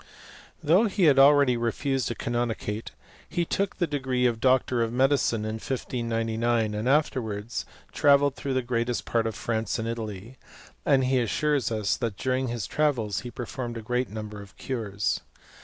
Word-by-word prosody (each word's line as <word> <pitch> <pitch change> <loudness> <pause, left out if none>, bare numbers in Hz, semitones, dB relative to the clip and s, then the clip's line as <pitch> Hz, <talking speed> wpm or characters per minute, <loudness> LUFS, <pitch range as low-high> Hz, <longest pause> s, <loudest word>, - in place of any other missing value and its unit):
Though 180 +9 +5
he 200 -2 0
had. 145 -4 +6
already 140 -2 +6
refused 130 +3 -1
a 120 - -3
canonicate, 115 -2 -2 0.4
he 175 - 0
took 195 +3 -1
the 175 - +1
degree 130 -4 -1
of 120 -2 +1
doctor 130 -1 +3
of 115 -1 0
medicine, 125 -3 +2
in 110 +1 -3
1599, 115 -3 -1
and 105 +4 -1
afterwards 120 -7 0 0.2
travelled 140 -1 +4
through 135 -2 -3
the 130 - +1
greatest 120 0 -1
part 115 -1 +1
of 110 - -4
France 115 +1 -2
and 115 -1 -3
Italy; 115 +1 -6 0.5
and 135 -1 +4
he 130 0 +2
assures 140 +3 0
us, 110 -3 0
that 115 -5 -3
during 130 0 0
his 115 -4 -3
travels, 120 -10 0
he 120 - -7
performed 120 0 -5
a 115 - -7
great 125 +2 -1
num 105 0 -6
ber 105 -1 -8
of 100 -1 -14
cures. 105 -6 -2
120 Hz, 170 wpm, -26 LUFS, 110-135 Hz, 0.5 s, had